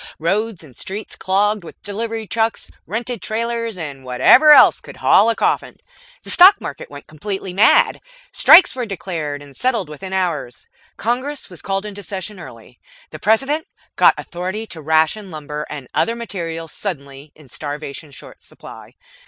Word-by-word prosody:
Roads 195 +3 -1
and 135 -6 -16
streets 200 - -6
clogged 205 +1 0
with 165 - -12
delivery 220 +2 -4
trucks, 225 +1 -2 0.2
rented 235 0 -4
trailers, 230 -1 -3
and 145 -5 -7
whatever 125 - +5
else 295 - +7
could - - -12
haul 230 - +4
a 230 - +1
coffin. - - -1 0.5
The - - -5
Stock 390 +3 +8
Market - - -8
went - - -11
completely 190 +4 -6
mad. 210 +4 +4 0.3
Strikes 355 +3 +7
were 250 -3 -4
declared 160 -7 -5
and 140 -1 -15
settled 235 -10 -1
within 155 +6 -8
hours. 175 -9 -2 0.3
Congress 255 +3 -3
was 175 - -10
called 195 +1 -2
into 205 -1 -7
session 200 0 -6
early. - - -13 0.3
The - - -9
President 270 +9 +1 0.3
got - - +5
authority 185 +5 -5
to 160 - -9
ration 160 +7 +1
lumber 150 -2 -6
and 140 -4 -8
other 230 - +1
materials 165 -8 -6
suddenly 140 -6 -7
in 150 -3 -18
starvation 145 +3 -7
short 140 - -14
supply. - - -13
195 Hz, 155 wpm, -19 LUFS, 155-225 Hz, 0.5 s, Stock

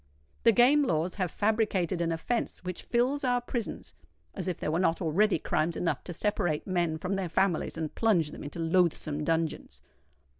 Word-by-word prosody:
The - - +8
Game 250 +7 +5
Laws 170 - 0
have 180 - +1
fabricated 205 -5 0
an 165 -1 0
offence 180 +9 -2
which 180 -1 -5
fills 255 +4 0
our 245 -1 +2
prisons—as 240 -5 -7
if 180 - -2
there - - -2
were 165 - +1
not 170 -3 +2
already 190 +4 +2
crimes 160 +1 -1
enough 170 - -1
to - - -6
separate 175 -4 -1
men 175 -4 0
from 180 +4 -3
their 195 -3 -2
families 175 -1 0
and 160 -2 -3
plunge 180 -10 +2
them - - -9
into 145 - -7
loathsome 165 -3 +1
dungeons. 165 0 -2
180 Hz, 175 wpm, -29 LUFS, 165-215 Hz, -, The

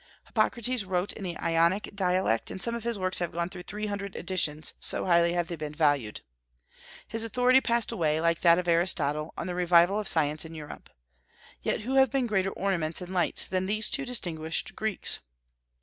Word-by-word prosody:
Hippocrates 235 +1 0
wrote 185 0 -1
in 205 - -9
the 175 -2 -4
Ionic 170 +4 +1
dialect, 185 - 0
and - - -6
some 235 +4 0
of 235 -1 -4
his 235 -2 -2
works 185 -1 0
have 175 -2 -2
gone 170 +1 -2
through 180 -1 -8
three 210 +4 -5
hundred 200 -1 -5
editions, 155 -5 -1
so - - 0
highly 170 -1 +3
have 175 -1 -1
they 170 - -4
been 150 -1 -6
valued. 145 -9 +1 0.9
His 225 0 -3
authority 250 +3 +3
passed 235 -3 0
away, 155 -3 0
like 170 0 +1
that 170 -1 +6
of 180 -1 -2
Aristotle, 165 -3 +1
on - - -4
the 180 - -4
revival 175 +2 +4
of 210 - -3
science 155 -1 +2
in 160 0 -10
Europe. 150 - -10 0.7
Yet - - -1
who 250 +5 -4
have 265 -1 +5
been 265 +1 0
greater 195 -4 0
ornaments 175 -5 -1
and 180 0 -7
lights 175 -3 +2
than 185 0 -1
these 215 +2 +1
two 275 - +2
distinguished 165 -10 -2
Greeks? 215 -2 0
180 Hz, 195 wpm, -28 LUFS, 165-210 Hz, 0.9 s, that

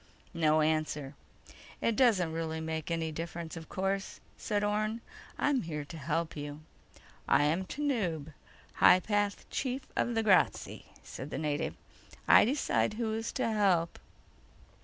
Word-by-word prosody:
No 155 -2 +3
answer. 155 -2 0 0.7
"It 230 - +1
doesn't 200 -11 +3
really 160 -1 -3
make 160 -1 -4
any 165 -1 -1
difference, 165 +1 -6
of 160 -1 -9
course," 195 0 -2 0.2
said 205 -1 -1
Orne. 215 +2 0 0.4
"I'm 285 -4 +2
here 150 -3 -5
to 155 - -10
help 160 +3 -2
you." 145 0 -6 0.7
"I - - +4
am 165 +6 +1
Tanub, 190 - -2 0.4
High 185 - +7
Path 205 0 -1
Chief 260 0 -2
of 240 - 0
the 225 - +1
Grazzi," 195 -4 +2 0.2
said 130 - -8
the - - -4
native. 150 0 -2 0.5
"I - - +8
decide 255 -4 +1
who 220 -1 -1
is 225 +1 -3
to - - 0
help." 195 -6 +1
170 Hz, 140 wpm, -31 LUFS, 155-215 Hz, 0.7 s, I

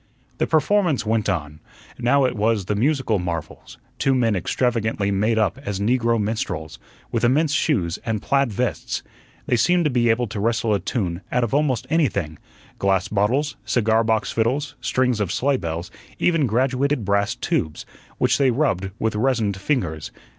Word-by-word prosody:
The - - +1
performance 160 - +2
went 110 -1 0
on. 75 -4 -3 0.4
Now 130 +3 +3
it 125 -1 -1
was 105 -2 +1
the 105 - -1
"musical 120 -1 +1
marvels," 85 -3 -6 0.2
two 135 -1 +2
men 115 -4 +2
extravagantly 110 +1 0
made 105 +3 +1
up 110 +4 +1
as 100 -7 -3
negro 115 +1 +2
minstrels, 110 +2 -3 0.3
with 115 -1 -1
immense 145 +5 +3
shoes 95 - 0
and 110 -2 -1
plaid 135 +2 +1
vests. 125 +4 -2 0.4
They 125 - +1
seemed 175 +7 +3
to 150 - +1
be 120 -1 +2
able 115 +2 +2
to 105 - -5
wrestle 115 0 +1
a 100 - +1
tune 90 -7 -2
out 125 - +1
of 120 - -2
almost 140 -5 +1
anything 100 - 0 0.4
glass 95 0 +1
bottles, 120 +7 0
cigar 110 0 +2
box 110 -1 0
fiddles, 130 +5 0
strings 125 -3 +1
of 100 -4 -1
sleigh 140 +5 +1
bells, 85 -2 -5 0.3
even 165 -6 +2
graduated 130 +2 +1
brass 100 +4 +1
tubes, 120 - -2 0.3
which - - +2
they 135 -2 +4
rubbed 120 - 0
with 110 0 -1
resined 110 -3 +1
fingers. 95 - -2
115 Hz, 165 wpm, -22 LUFS, 100-130 Hz, 0.4 s, they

